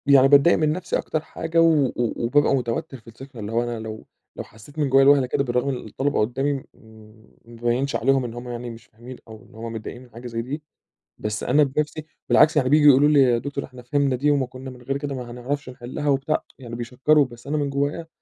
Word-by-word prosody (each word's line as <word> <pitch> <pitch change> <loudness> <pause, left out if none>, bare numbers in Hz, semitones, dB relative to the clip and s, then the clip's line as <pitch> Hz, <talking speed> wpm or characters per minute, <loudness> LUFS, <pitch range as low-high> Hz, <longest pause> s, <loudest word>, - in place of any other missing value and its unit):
يعني 135 -1 +6
باتضايق 140 +4 +6
من 155 -1 +2
نفسي 180 +3 -2
أكتر 155 - -2
حاجة 165 +1 -1
و 160 -4 +4
و 125 - -2 0.3
وبابقى 140 +3 +3
متوتّر 125 +1 -3
في 115 - -24
السكشن، 120 +2 -12
اللي 105 0 -5
هو 115 +1 +1
أنا 120 -1 -4
لو 110 0 -8 0.3
لو - - -5
حسّيت 125 +8 -14
من 145 -2 +1
جوّه 135 +1 +5
لوهلة 140 -1 +5
كده 140 - 0
بالرغم 125 +1 -1
إن 135 - -1
الطلبة 140 +2 -1
قُدّامي 135 +6 0
م 135 - -5 0.8
ما 115 0 -14
أبيّنش 125 +4 0
عليهم 135 +2 +2
إن 115 - -6
هم 120 +1 -8
يعني 120 0 -5
مش 115 -1 -11
فاهمين 120 +3 -12
أو 110 -1 -12
إن 120 - -19
هم 115 +1 -6
متضايقين 115 +2 -7
من 125 - -18
حاجة 120 +2 -9
زي 115 -1 -3
دي، 145 +6 -6 0.5
بس 105 0 -4
أنا 145 +4 +4
بنفسي 150 +2 -2 0.2
بالعكس، 155 0 +5
يعني 130 -3 +2
بييجوا 150 +1 +6
يقولوا 140 +2 +6
لي: 145 -2 +5
"يا 125 -3 +4
دكتور 140 +3 -4
إحنا 130 -1 -13
فهمنا 140 +1 +1
دي 145 +4 +2
وما 140 -2 +1
كُنّا 130 +1 -10
من 125 -1 -12
غير 135 +3 -2
كده 140 -1 -4
ما 125 -2 -7
هنعرفش 130 +3 -4
نحلّها،" 130 +3 -5
وبتاع، 140 +2 0 0.2
يعني 120 -3 -8
بيشكّروا 130 +5 +2
بس 120 0 -13
أنا 150 +2 -1
من 145 -1 -1
جوّايا 145 +4 -2
130 Hz, 235 wpm, -23 LUFS, 120-145 Hz, 0.8 s, يعني